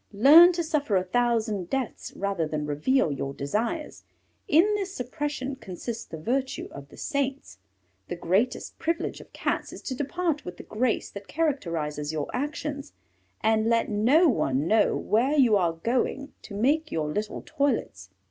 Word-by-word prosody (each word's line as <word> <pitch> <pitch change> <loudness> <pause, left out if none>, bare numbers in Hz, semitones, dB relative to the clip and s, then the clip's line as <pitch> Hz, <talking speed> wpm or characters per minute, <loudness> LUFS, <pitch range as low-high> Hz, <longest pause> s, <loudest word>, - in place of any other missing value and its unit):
Learn 300 - +9
to 340 0 -1
suffer 295 -9 0
a 185 - +3
thousand 220 -3 0
deaths 265 -4 -3
rather 195 -5 -1
than 150 -1 -3
reveal 150 - +1
your 140 0 -4
desires; 235 - -3 0.5
in 315 +3 +6
this 395 -2 -2
suppression 270 +1 -3
consists 230 +1 -6
the 160 - -8
virtue 260 - -2
of 140 0 -10
the - - -15
saints. 275 - -3 0.5
The - - -4
greatest 190 +8 -1
privilege 330 +1 -2
of - - -17
Cats - - -2
is - - -10
to 265 - -3
depart 300 +3 -2
with 180 -1 -8
the - - -9
grace 235 +2 -1
that 200 0 -9
characterizes 165 - -2
your 155 -2 -3
actions, 290 +1 -4 0.5
and 220 0 +2
let 230 0 +2
no 245 - +4
one 140 - +1
know 210 +4 +3
where 260 +8 +1
you 245 -6 +5
are 175 -4 +2
going 250 - -1
to 205 - -9
make 295 +9 +1
your 155 -2 -1
little 210 +7 -3
toilets. 250 - -1
235 Hz, 160 wpm, -26 LUFS, 180-280 Hz, 0.5 s, Learn